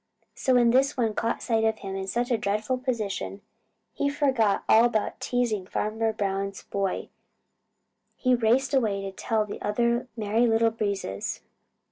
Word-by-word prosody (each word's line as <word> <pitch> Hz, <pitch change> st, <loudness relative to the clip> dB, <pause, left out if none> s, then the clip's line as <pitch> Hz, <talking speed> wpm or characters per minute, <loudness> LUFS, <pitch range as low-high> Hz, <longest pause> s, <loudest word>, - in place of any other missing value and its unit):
So 260 Hz, -, +1 dB
when 240 Hz, -1 st, +5 dB
this 270 Hz, +3 st, +3 dB
one 225 Hz, -3 st, +1 dB
caught 230 Hz, +2 st, -2 dB
sight 225 Hz, -2 st, +1 dB
of 220 Hz, 0 st, +2 dB
him 195 Hz, -2 st, -6 dB
in 190 Hz, 0 st, -4 dB
such 240 Hz, +5 st, -1 dB
a 235 Hz, -, +3 dB
dreadful 215 Hz, +5 st, -1 dB
position, 215 Hz, -5 st, -3 dB, 0.5 s
he 280 Hz, -, 0 dB
forgot 260 Hz, -8 st, +1 dB
all 225 Hz, -, +6 dB
about 230 Hz, -3 st, 0 dB
teasing 230 Hz, -6 st, -1 dB
Farmer 220 Hz, +2 st, -1 dB
Brown's 195 Hz, -2 st, -3 dB
boy. 195 Hz, -1 st, -2 dB, 1.1 s
He 255 Hz, -1 st, +2 dB
raced 245 Hz, +3 st, +2 dB
away 215 Hz, -7 st, +1 dB
to 195 Hz, -, -4 dB
tell 215 Hz, +2 st, -1 dB
the 205 Hz, -, -8 dB
other 235 Hz, +4 st, 0 dB
Merry 220 Hz, +2 st, +2 dB
Little 225 Hz, 0 st, +3 dB
Breezes. 200 Hz, -, -3 dB
225 Hz, 155 wpm, -26 LUFS, 205-245 Hz, 1.1 s, all